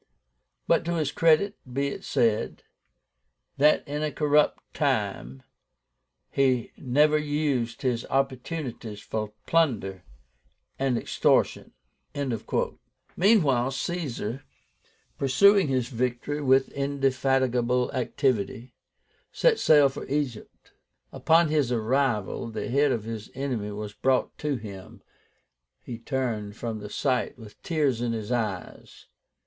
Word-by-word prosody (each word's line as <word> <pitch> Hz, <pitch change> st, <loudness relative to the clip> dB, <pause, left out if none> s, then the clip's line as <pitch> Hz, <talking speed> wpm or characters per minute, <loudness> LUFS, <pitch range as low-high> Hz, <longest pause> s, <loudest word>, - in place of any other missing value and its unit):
But -, -, +3 dB
to 170 Hz, -, -1 dB
his 155 Hz, -3 st, 0 dB
credit 165 Hz, +6 st, +3 dB
be 140 Hz, +2 st, 0 dB
it -, -, -7 dB
said, 115 Hz, -2 st, 0 dB, 0.9 s
that 150 Hz, +2 st, +4 dB
in 145 Hz, +1 st, -3 dB
a 155 Hz, -1 st, -1 dB
corrupt 150 Hz, 0 st, +1 dB
time 100 Hz, -, -1 dB, 0.9 s
he 130 Hz, -4 st, +1 dB
never 150 Hz, +3 st, +3 dB
used 145 Hz, -6 st, -1 dB
his 120 Hz, -3 st, 0 dB
opportunities 130 Hz, -4 st, -3 dB
for 105 Hz, 0 st, -4 dB
plunder 110 Hz, -, +1 dB, 0.8 s
and 135 Hz, -3 st, +1 dB
extortion." -, -, +1 dB, 1.4 s
Meanwhile 155 Hz, -, +3 dB
Caesar, 135 Hz, -, -4 dB, 0.8 s
pursuing 190 Hz, +8 st, +5 dB
his 130 Hz, -3 st, 0 dB
victory 125 Hz, +4 st, -2 dB
with 135 Hz, -1 st, +3 dB
indefatigable 130 Hz, -3 st, +1 dB
activity, 125 Hz, -2 st, -1 dB, 0.6 s
set 475 Hz, -3 st, +3 dB
sail 145 Hz, -3 st, +6 dB
for 135 Hz, -, -7 dB
Egypt. 135 Hz, -5 st, -4 dB, 0.4 s
Upon 165 Hz, 0 st, +3 dB
his 150 Hz, -5 st, +1 dB
arrival 120 Hz, -2 st, 0 dB
the 110 Hz, -1 st, -5 dB
head 140 Hz, +3 st, +3 dB
of 115 Hz, -4 st, -1 dB
his 110 Hz, -1 st, -6 dB
enemy 125 Hz, -7 st, -3 dB
was 105 Hz, 0 st, -6 dB
brought 130 Hz, +3 st, 0 dB
to 150 Hz, -2 st, -1 dB
him. 100 Hz, -5 st, -10 dB, 0.8 s
He 115 Hz, -2 st, -7 dB
turned 115 Hz, -5 st, -3 dB
from 115 Hz, -2 st, -4 dB
the 105 Hz, 0 st, -8 dB
sight 125 Hz, +2 st, -1 dB
with 110 Hz, -3 st, -14 dB
tears 145 Hz, -8 st, 0 dB
in 120 Hz, -1 st, -1 dB
his 110 Hz, 0 st, -4 dB
eyes. 110 Hz, -7 st, -4 dB
130 Hz, 110 wpm, -26 LUFS, 115-145 Hz, 1.4 s, sail